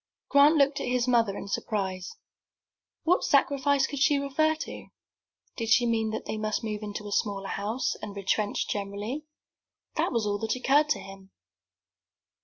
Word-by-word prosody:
Grant 285 Hz, +3 st, +6 dB
looked 280 Hz, -1 st, +3 dB
at -, -, -3 dB
his 250 Hz, 0 st, +1 dB
mother 230 Hz, -5 st, +2 dB
in -, -, -7 dB
surprise. 190 Hz, -3 st, -3 dB, 0.9 s
What 355 Hz, +3 st, +3 dB
sacrifice 280 Hz, -1 st, +3 dB
could 285 Hz, 0 st, -5 dB
she 295 Hz, 0 st, +4 dB
refer 280 Hz, +3 st, +1 dB
to? 315 Hz, -, -7 dB, 0.7 s
Did 230 Hz, -2 st, -3 dB
she 240 Hz, +1 st, +5 dB
mean 225 Hz, -2 st, +1 dB
that 220 Hz, -, -4 dB
they -, -, -3 dB
must 215 Hz, +2 st, -2 dB
move 215 Hz, -1 st, -3 dB
into 210 Hz, 0 st, -6 dB
a -, -, -7 dB
smaller 200 Hz, -2 st, -1 dB
house, 215 Hz, +6 st, -1 dB
and 210 Hz, -1 st, -7 dB
retrench 200 Hz, +1 st, -1 dB
generally? 205 Hz, +8 st, -4 dB, 0.7 s
That -, -, +1 dB
was 230 Hz, -4 st, 0 dB
all 205 Hz, 0 st, -1 dB
that 220 Hz, +2 st, -1 dB
occurred 285 Hz, +4 st, +3 dB
to -, -, +1 dB
him. 195 Hz, 0 st, -12 dB
225 Hz, 165 wpm, -28 LUFS, 205-280 Hz, 0.9 s, Grant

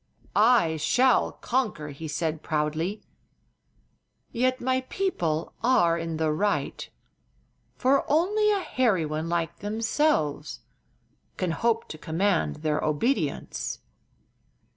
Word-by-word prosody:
"I 210 Hz, -8 st, +4 dB
shall 245 Hz, -, +3 dB
conquer," 240 Hz, -, -2 dB
he 150 Hz, +3 st, -7 dB
said, 155 Hz, +1 st, -2 dB
proudly. 155 Hz, +6 st, -2 dB, 1.3 s
"Yet 255 Hz, +2 st, +1 dB
my 260 Hz, +1 st, 0 dB
people 170 Hz, -, -1 dB
are 175 Hz, -10 st, +4 dB
in 165 Hz, -1 st, -3 dB
the 160 Hz, -1 st, +1 dB
right, 200 Hz, +7 st, -1 dB, 0.9 s
for 270 Hz, +2 st, +3 dB
only 410 Hz, +8 st, +3 dB
a 405 Hz, -2 st, +2 dB
hairy 230 Hz, -, +1 dB
one 155 Hz, +2 st, -3 dB
like 170 Hz, -2 st, -2 dB
themselves 205 Hz, -, 0 dB, 0.8 s
can 185 Hz, -2 st, -1 dB
hope 230 Hz, +5 st, 0 dB
to 155 Hz, -, -8 dB
command 165 Hz, -2 st, 0 dB
their 155 Hz, -1 st, 0 dB
obedience." 150 Hz, -, -1 dB
170 Hz, 105 wpm, -26 LUFS, 155-250 Hz, 1.3 s, I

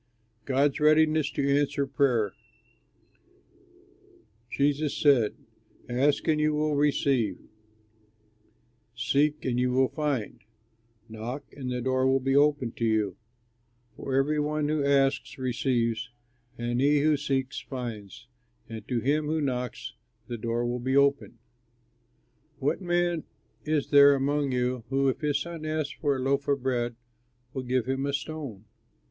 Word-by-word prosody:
'" 115 Hz, -1 st, -42 dB
GOD'S 140 Hz, +1 st, +1 dB
READINESS 155 Hz, 0 st, +4 dB
TO 140 Hz, -, -1 dB
ANSWER 140 Hz, -1 st, 0 dB
PRAYER 125 Hz, -, +1 dB, 2.2 s
Jesus 145 Hz, +1 st, 0 dB
said: 130 Hz, -8 st, +4 dB, 0.5 s
"Ask 140 Hz, +6 st, +1 dB
and 155 Hz, -1 st, +2 dB
you 150 Hz, 0 st, +2 dB
will 150 Hz, 0 st, 0 dB
receive, 140 Hz, -8 st, +1 dB, 1.6 s
seek 145 Hz, +5 st, +1 dB
and 125 Hz, -2 st, 0 dB
you 125 Hz, 0 st, +1 dB
will 130 Hz, +1 st, +3 dB
find, 145 Hz, -9 st, -2 dB, 0.7 s
knock 115 Hz, +5 st, -6 dB
and 130 Hz, -3 st, -5 dB
the 125 Hz, 0 st, -2 dB
door 130 Hz, 0 st, +1 dB
will 135 Hz, 0 st, +3 dB
be 135 Hz, +1 st, 0 dB
opened 145 Hz, -4 st, +2 dB
to 115 Hz, -, 0 dB
you; 110 Hz, -3 st, +1 dB, 0.8 s
for 135 Hz, -, -4 dB
every 145 Hz, +3 st, +2 dB
one 150 Hz, 0 st, 0 dB
who 155 Hz, -2 st, 0 dB
asks 135 Hz, -1 st, +1 dB
receives, 120 Hz, -2 st, -1 dB, 0.5 s
and 120 Hz, +1 st, -1 dB
he 145 Hz, +1 st, +4 dB
who 155 Hz, +1 st, +3 dB
seeks 135 Hz, -2 st, -2 dB
finds, 120 Hz, -5 st, -7 dB, 0.4 s
and 110 Hz, -1 st, -8 dB
to 120 Hz, -3 st, -1 dB
him 150 Hz, +4 st, +1 dB
who 160 Hz, +1 st, 0 dB
knocks 130 Hz, -2 st, -3 dB, 0.3 s
the 120 Hz, -, -5 dB
door 115 Hz, +2 st, -1 dB
will 120 Hz, +1 st, -2 dB
be 130 Hz, +3 st, 0 dB
opened. 140 Hz, -3 st, +2 dB, 1.2 s
"What 140 Hz, +8 st, -1 dB
man 175 Hz, -2 st, 0 dB, 0.4 s
is 150 Hz, -2 st, -1 dB
there 140 Hz, -1 st, +8 dB
among 140 Hz, +1 st, 0 dB
you, 125 Hz, -1 st, -1 dB
who 135 Hz, 0 st, +1 dB
if 130 Hz, -, -3 dB
his 145 Hz, -2 st, +1 dB
son 170 Hz, 0 st, -6 dB
asks 155 Hz, -2 st, -2 dB
him -, -, -23 dB
for 145 Hz, -3 st, +2 dB
a -, -, -3 dB
loaf 140 Hz, +2 st, 0 dB
of 140 Hz, -2 st, 0 dB
bread, 120 Hz, -2 st, -1 dB, 0.6 s
will 130 Hz, -, -3 dB
give 125 Hz, -1 st, 0 dB
him 135 Hz, +2 st, -1 dB
a 140 Hz, -, -2 dB
stone? 140 Hz, -8 st, -5 dB
135 Hz, 145 wpm, -27 LUFS, 125-145 Hz, 2.2 s, there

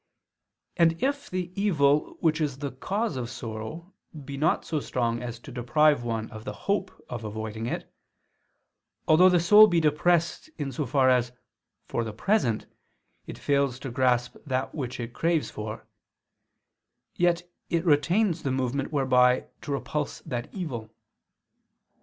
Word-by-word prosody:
And 165 Hz, -2 st, +5 dB
if 285 Hz, +1 st, -1 dB
the 180 Hz, -1 st, -3 dB
evil 150 Hz, -8 st, +2 dB
which 160 Hz, -1 st, +2 dB
is 140 Hz, -4 st, -1 dB
the 140 Hz, -1 st, -4 dB
cause 195 Hz, -, -2 dB
of 120 Hz, -2 st, -3 dB
sorrow 120 Hz, -, -7 dB, 0.3 s
be 140 Hz, +1 st, -6 dB
not 155 Hz, +4 st, +1 dB
so 155 Hz, -, -1 dB
strong 120 Hz, -4 st, -1 dB
as 120 Hz, -1 st, -5 dB
to 120 Hz, -, -12 dB
deprive 130 Hz, +3 st, +3 dB
one 115 Hz, -2 st, -2 dB
of 110 Hz, -2 st, -9 dB
the -, -, -5 dB
hope 200 Hz, -1 st, -2 dB
of 120 Hz, -2 st, -6 dB
avoiding 110 Hz, +1 st, -4 dB
it, -, -, -5 dB, 1.1 s
although 175 Hz, +4 st, +7 dB
the 180 Hz, -1 st, +4 dB
soul 210 Hz, +5 st, +8 dB
be 175 Hz, -4 st, +2 dB
depressed 170 Hz, -, +1 dB
in 140 Hz, -2 st, -3 dB
so 135 Hz, +2 st, -3 dB
far 130 Hz, +1 st, +3 dB
as, 125 Hz, -1 st, +1 dB, 0.5 s
for 120 Hz, -, -1 dB
the 110 Hz, -2 st, -5 dB
present, 120 Hz, -, +1 dB, 0.6 s
it -, -, -7 dB
fails 140 Hz, -3 st, +1 dB
to 135 Hz, -, -5 dB
grasp 125 Hz, -1 st, +1 dB
that 130 Hz, -2 st, -2 dB
which 125 Hz, -5 st, -4 dB
it 120 Hz, 0 st, -5 dB
craves 165 Hz, +1 st, 0 dB
for; 110 Hz, 0 st, -6 dB, 1.3 s
yet 175 Hz, 0 st, +1 dB, 0.2 s
it 170 Hz, +1 st, 0 dB
retains 170 Hz, +4 st, +2 dB
the 135 Hz, -, -1 dB
movement 130 Hz, +2 st, -1 dB
whereby 125 Hz, -3 st, +3 dB, 0.2 s
to 145 Hz, -, -6 dB
repulse 145 Hz, +1 st, -3 dB
that 120 Hz, -1 st, -5 dB
evil. 130 Hz, -, -5 dB
140 Hz, 150 wpm, -27 LUFS, 120-170 Hz, 1.3 s, soul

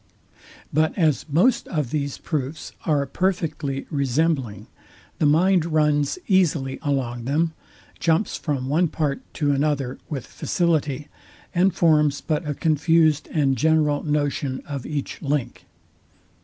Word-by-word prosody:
But 155 Hz, +5 st, +1 dB
as 160 Hz, -5 st, +1 dB
most 205 Hz, -, +3 dB
of 150 Hz, -7 st, -2 dB
these 140 Hz, -2 st, -2 dB
proofs 150 Hz, 0 st, -4 dB, 0.2 s
are 145 Hz, -3 st, +2 dB
perfectly 150 Hz, -4 st, -2 dB
resembling, 135 Hz, -, 0 dB, 0.5 s
the 150 Hz, -, +3 dB
mind 175 Hz, +4 st, +4 dB
runs 150 Hz, -, +1 dB
easily 160 Hz, -9 st, +2 dB
along 130 Hz, -5 st, -2 dB
them, 160 Hz, +5 st, +1 dB, 0.5 s
jumps 165 Hz, +5 st, +1 dB
from 140 Hz, -5 st, -2 dB
one 165 Hz, +6 st, +2 dB
part 150 Hz, -3 st, -2 dB
to 145 Hz, -2 st, +1 dB
another 140 Hz, -2 st, 0 dB
with 140 Hz, -5 st, -4 dB
facility, 150 Hz, -5 st, -1 dB, 0.5 s
and 185 Hz, +2 st, +3 dB
forms 150 Hz, -5 st, +3 dB
but 155 Hz, 0 st, -2 dB
a 145 Hz, -, -2 dB
confused 155 Hz, -1 st, +2 dB
and 140 Hz, -4 st, +2 dB
general 150 Hz, +1 st, +2 dB
notion 145 Hz, -3 st, -1 dB
of 140 Hz, -4 st, -5 dB
each 145 Hz, -2 st, -4 dB
link. 140 Hz, -4 st, -2 dB
150 Hz, 125 wpm, -23 LUFS, 140-160 Hz, 0.5 s, mind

